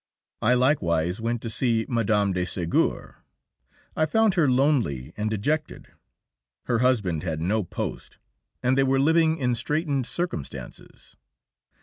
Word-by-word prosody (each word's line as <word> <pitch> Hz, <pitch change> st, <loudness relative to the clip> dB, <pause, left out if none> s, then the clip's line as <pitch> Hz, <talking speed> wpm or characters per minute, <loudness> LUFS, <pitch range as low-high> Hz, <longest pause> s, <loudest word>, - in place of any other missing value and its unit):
I 120 Hz, +3 st, +3 dB
likewise 90 Hz, -, +1 dB
went 115 Hz, 0 st, -2 dB
to 115 Hz, -, -4 dB
see 115 Hz, -2 st, 0 dB
Mme. 105 Hz, -4 st, +1 dB
de 90 Hz, 0 st, -1 dB
Ségur. 85 Hz, -2 st, -1 dB, 0.8 s
I 155 Hz, -, +1 dB
found 220 Hz, 0 st, +3 dB
her 165 Hz, -7 st, +3 dB
lonely 125 Hz, -, +1 dB
and 105 Hz, 0 st, -2 dB
dejected; 150 Hz, +9 st, -2 dB, 0.7 s
her 120 Hz, -2 st, 0 dB
husband 105 Hz, -11 st, +1 dB
had 80 Hz, -4 st, -3 dB
no 100 Hz, +6 st, 0 dB
post, 85 Hz, -, -6 dB, 0.5 s
and 125 Hz, +1 st, +3 dB
they 135 Hz, -, +3 dB
were 135 Hz, 0 st, +2 dB
living 160 Hz, +2 st, +3 dB
in 125 Hz, -4 st, 0 dB
straitened 140 Hz, +2 st, -1 dB
circumstances. 170 Hz, -, -6 dB
120 Hz, 130 wpm, -25 LUFS, 100-145 Hz, 0.8 s, I